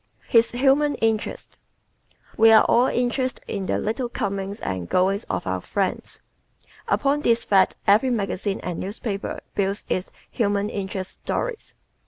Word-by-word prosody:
His 230 Hz, 0 st, +4 dB
"Human 275 Hz, +4 st, +2 dB
Interest" 220 Hz, -1 st, -2 dB, 0.5 s
¶ -, -, -35 dB, 0.2 s
We 225 Hz, +1 st, +6 dB
are 220 Hz, -, +8 dB
all 245 Hz, +2 st, +4 dB
interested 250 Hz, +1 st, -1 dB
in 195 Hz, -2 st, -4 dB
the -, -, 0 dB
little 235 Hz, +3 st, -2 dB
comings 200 Hz, -3 st, -3 dB
and 95 Hz, -3 st, -4 dB
goings 195 Hz, +4 st, +1 dB
of -, -, -3 dB
our -, -, -2 dB
friends. -, -, -3 dB, 0.7 s
Upon 285 Hz, +1 st, +1 dB
this 235 Hz, -4 st, +2 dB
fact 195 Hz, -2 st, +3 dB
every 215 Hz, +6 st, +4 dB
magazine 200 Hz, -3 st, -2 dB
and 175 Hz, -2 st, -4 dB
newspaper 200 Hz, +1 st, -4 dB
builds 200 Hz, +1 st, -1 dB
its 185 Hz, -, -1 dB, 0.2 s
"human 205 Hz, -3 st, 0 dB
interest" 190 Hz, -1 st, -4 dB
stories. -, -, -4 dB
210 Hz, 145 wpm, -23 LUFS, 195-245 Hz, 0.7 s, are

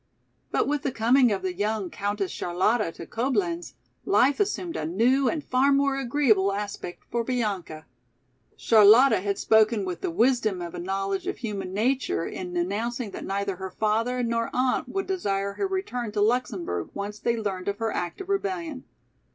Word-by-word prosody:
But -, -, +1 dB
with 290 Hz, 0 st, 0 dB
the 275 Hz, -, -1 dB
coming 245 Hz, +2 st, +4 dB
of 195 Hz, -, -2 dB
the 185 Hz, -1 st, -1 dB
young 205 Hz, 0 st, -2 dB
Countess 200 Hz, -2 st, -2 dB
Charlotta 185 Hz, +3 st, 0 dB
to 170 Hz, -, -9 dB
Coblenz, 205 Hz, -9 st, -2 dB, 0.3 s
life 250 Hz, +8 st, +3 dB
assumed 385 Hz, -4 st, -1 dB
a -, -, -3 dB
new 240 Hz, -, +2 dB
and 310 Hz, -3 st, -3 dB
far 260 Hz, +2 st, +2 dB
more 275 Hz, 0 st, +3 dB
agreeable 235 Hz, -7 st, +2 dB
aspect 205 Hz, -3 st, -5 dB
for 235 Hz, -1 st, 0 dB
Bianca. 205 Hz, -10 st, -3 dB, 0.7 s
Charlotta 220 Hz, +1 st, +6 dB
had 200 Hz, 0 st, -1 dB
spoken 220 Hz, -1 st, +3 dB
with 180 Hz, -2 st, -5 dB
the -, -, -1 dB
wisdom 220 Hz, 0 st, +2 dB
of 175 Hz, -1 st, -6 dB
a 175 Hz, -, -6 dB
knowledge 195 Hz, +2 st, -2 dB
of -, -, -2 dB
human 200 Hz, -6 st, -4 dB
nature 225 Hz, -3 st, 0 dB
in 180 Hz, -1 st, -5 dB
announcing 220 Hz, +6 st, -2 dB
that -, -, -7 dB
neither 195 Hz, -1 st, -2 dB
her 190 Hz, 0 st, -5 dB
father 225 Hz, +5 st, 0 dB
nor 230 Hz, 0 st, 0 dB
aunt 255 Hz, 0 st, +1 dB
would 390 Hz, 0 st, -2 dB
desire 200 Hz, -, -1 dB
her 395 Hz, -, -1 dB
return 250 Hz, -, -3 dB
to 210 Hz, -, -1 dB
Luxemburg 205 Hz, -, 0 dB
once 205 Hz, +1 st, -5 dB
they 235 Hz, -1 st, 0 dB
learned 195 Hz, -4 st, -3 dB
of 200 Hz, 0 st, -1 dB
her 225 Hz, 0 st, -1 dB
act 175 Hz, -, -4 dB
of 380 Hz, -, -8 dB
rebellion. 365 Hz, -8 st, -2 dB
215 Hz, 175 wpm, -26 LUFS, 195-255 Hz, 0.7 s, Charlotta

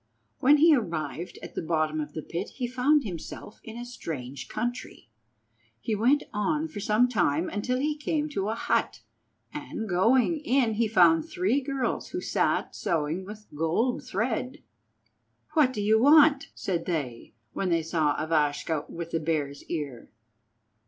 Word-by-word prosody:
When 290 Hz, +3 st, +6 dB
he 315 Hz, +1 st, +6 dB
arrived 165 Hz, -, -4 dB
at -, -, -8 dB
the -, -, -3 dB
bottom 155 Hz, -1 st, 0 dB
of 150 Hz, 0 st, -7 dB
the 155 Hz, -, -5 dB
pit 175 Hz, +4 st, -5 dB
he 255 Hz, -, -2 dB
found 260 Hz, +4 st, +2 dB
himself 195 Hz, +1 st, -8 dB
in 225 Hz, +1 st, -9 dB
a 240 Hz, -, -6 dB
strange 140 Hz, -, -7 dB
country. 240 Hz, -, -5 dB, 0.7 s
He 225 Hz, -, -2 dB
went 250 Hz, +8 st, +3 dB
on 300 Hz, +9 st, 0 dB
for 205 Hz, -, -7 dB
some 215 Hz, +4 st, +3 dB
time 170 Hz, -, +1 dB
until 250 Hz, +5 st, -1 dB
he 295 Hz, +3 st, 0 dB
came 300 Hz, 0 st, -1 dB
to 205 Hz, -8 st, -2 dB
a 220 Hz, -, -1 dB
hut, -, -, -1 dB, 0.5 s
and, 290 Hz, -7 st, -5 dB
going 240 Hz, -, +3 dB
in, 260 Hz, -5 st, +2 dB
he 225 Hz, +1 st, +1 dB
found 170 Hz, -6 st, +5 dB
three 205 Hz, +11 st, +1 dB
girls 275 Hz, -1 st, -2 dB
who -, -, -3 dB
sat -, -, 0 dB
sewing 165 Hz, -1 st, -1 dB
with 210 Hz, +1 st, -10 dB
gold 165 Hz, -, 0 dB
thread. 250 Hz, +7 st, -3 dB, 0.9 s
"What 295 Hz, -5 st, +4 dB
do 210 Hz, -5 st, -3 dB
you 220 Hz, +2 st, +4 dB
want?" 290 Hz, 0 st, +6 dB
said 175 Hz, -4 st, -2 dB
they, 135 Hz, -11 st, -4 dB, 0.2 s
when 190 Hz, -, -1 dB
they 165 Hz, -1 st, +2 dB
saw 155 Hz, -2 st, +1 dB
Ivashka 155 Hz, -1 st, 0 dB
with 170 Hz, 0 st, -6 dB
the 165 Hz, -, 0 dB
Bear's 150 Hz, -3 st, -2 dB
Ear. 145 Hz, -8 st, -5 dB
205 Hz, 160 wpm, -27 LUFS, 160-255 Hz, 0.9 s, When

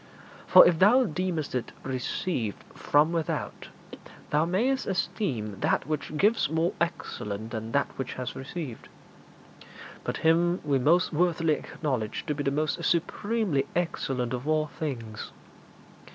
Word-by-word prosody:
For -, -, +9 dB
if 165 Hz, -2 st, +2 dB
thou 240 Hz, +7 st, +6 dB
deemest 175 Hz, -, -2 dB
it 125 Hz, -3 st, -3 dB
received 130 Hz, -, -2 dB
from 150 Hz, +3 st, +3 dB
without, 165 Hz, -3 st, -3 dB, 0.6 s
thou 150 Hz, +2 st, +3 dB
mayst 240 Hz, +10 st, 0 dB
esteem 130 Hz, -, -2 dB
that -, -, +1 dB
which 155 Hz, +1 st, -3 dB
gives 210 Hz, -3 st, +3 dB
more 160 Hz, +2 st, +1 dB
excellent 110 Hz, -10 st, -3 dB
than 110 Hz, 0 st, -4 dB
that 140 Hz, -, +3 dB
which 135 Hz, -, -3 dB
has 130 Hz, -1 st, -5 dB
received. 135 Hz, -2 st, -7 dB, 1.1 s
But -, -, -3 dB
Him 175 Hz, +2 st, +4 dB
we 140 Hz, -2 st, +2 dB
most 170 Hz, +7 st, +3 dB
worthily 165 Hz, -1 st, +2 dB
acknowledge 130 Hz, -8 st, -3 dB
to 150 Hz, -, -1 dB
be 145 Hz, -, -4 dB
the 140 Hz, -, +1 dB
most 155 Hz, +4 st, -1 dB
supremely 175 Hz, -2 st, 0 dB
excellent 135 Hz, -8 st, -1 dB
of 125 Hz, +3 st, -4 dB
all 155 Hz, 0 st, +2 dB
things. 115 Hz, -8 st, -5 dB
155 Hz, 135 wpm, -27 LUFS, 130-175 Hz, 1.1 s, For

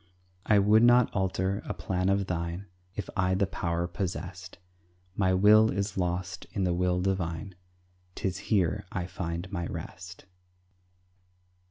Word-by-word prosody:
I 105 Hz, -, +5 dB
would 105 Hz, +2 st, +5 dB
not 120 Hz, +1 st, +5 dB
alter 95 Hz, +1 st, 0 dB
a -, -, -5 dB
plan 90 Hz, 0 st, -1 dB
of 100 Hz, 0 st, +2 dB
thine 85 Hz, +1 st, -3 dB, 0.3 s
If 105 Hz, -, -4 dB
I 95 Hz, -1 st, +2 dB
the 100 Hz, +1 st, +2 dB
power 85 Hz, -2 st, -2 dB
possessed; 90 Hz, 0 st, -5 dB, 0.6 s
My 95 Hz, -2 st, +2 dB
will 105 Hz, +3 st, +6 dB
is 100 Hz, 0 st, -2 dB
lost 90 Hz, -1 st, -2 dB
in 100 Hz, -, -1 dB
the 90 Hz, -1 st, +1 dB
will 90 Hz, 0 st, +1 dB
divine, 90 Hz, -1 st, -2 dB, 0.6 s
'Tis 95 Hz, -1 st, -2 dB
here 90 Hz, -6 st, +1 dB
I 90 Hz, -2 st, -2 dB
find 90 Hz, 0 st, -5 dB
my 85 Hz, -4 st, -2 dB
rest. 90 Hz, +2 st, -8 dB
95 Hz, 140 wpm, -29 LUFS, 90-100 Hz, 0.6 s, will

